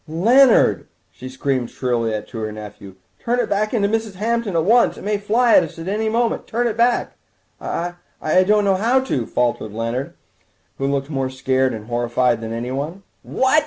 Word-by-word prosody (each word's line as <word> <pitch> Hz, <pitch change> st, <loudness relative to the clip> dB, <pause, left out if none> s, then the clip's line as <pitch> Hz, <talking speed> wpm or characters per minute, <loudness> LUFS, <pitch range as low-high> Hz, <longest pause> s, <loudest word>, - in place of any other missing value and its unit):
"Leonard!" 230 Hz, -, +4 dB, 0.2 s
she 130 Hz, -, -10 dB
screamed 130 Hz, -2 st, -2 dB
shrilly 115 Hz, -4 st, -1 dB
to 115 Hz, -, -7 dB
her 110 Hz, -1 st, -3 dB
nephew, 105 Hz, -2 st, -10 dB, 0.2 s
"turn 240 Hz, +1 st, -1 dB
it -, -, 0 dB
back 210 Hz, +1 st, 0 dB
into 210 Hz, -5 st, +1 dB
Mrs. 220 Hz, -1 st, -2 dB
Hampton 225 Hz, -1 st, -1 dB
at 165 Hz, -, +2 dB
once! 235 Hz, +4 st, +4 dB
It -, -, -10 dB
may 205 Hz, 0 st, -1 dB
fly 230 Hz, +4 st, +2 dB
at -, -, +7 dB
us 165 Hz, -, -8 dB
at 165 Hz, +2 st, -7 dB
any 215 Hz, +3 st, -1 dB
moment. 230 Hz, +1 st, -1 dB
Turn 240 Hz, +2 st, -1 dB
it 220 Hz, -, -2 dB
back!" 240 Hz, +1 st, +1 dB, 0.5 s
"I—I 175 Hz, 0 st, -1 dB
don't 210 Hz, +1 st, +3 dB
know 195 Hz, -1 st, +3 dB
how 240 Hz, +6 st, +2 dB
to," 135 Hz, -, -2 dB
faltered 120 Hz, -3 st, -1 dB
Leonard, 115 Hz, +4 st, -3 dB, 0.6 s
who 135 Hz, -, 0 dB
looked 140 Hz, +1 st, -2 dB
more 135 Hz, -2 st, -1 dB
scared 130 Hz, 0 st, 0 dB
and 110 Hz, -1 st, -7 dB
horrified 120 Hz, 0 st, 0 dB
than 110 Hz, 0 st, -5 dB
anyone. 135 Hz, +10 st, -4 dB, 0.2 s
"What!" 265 Hz, +4 st, +2 dB
165 Hz, 185 wpm, -20 LUFS, -, 0.6 s, at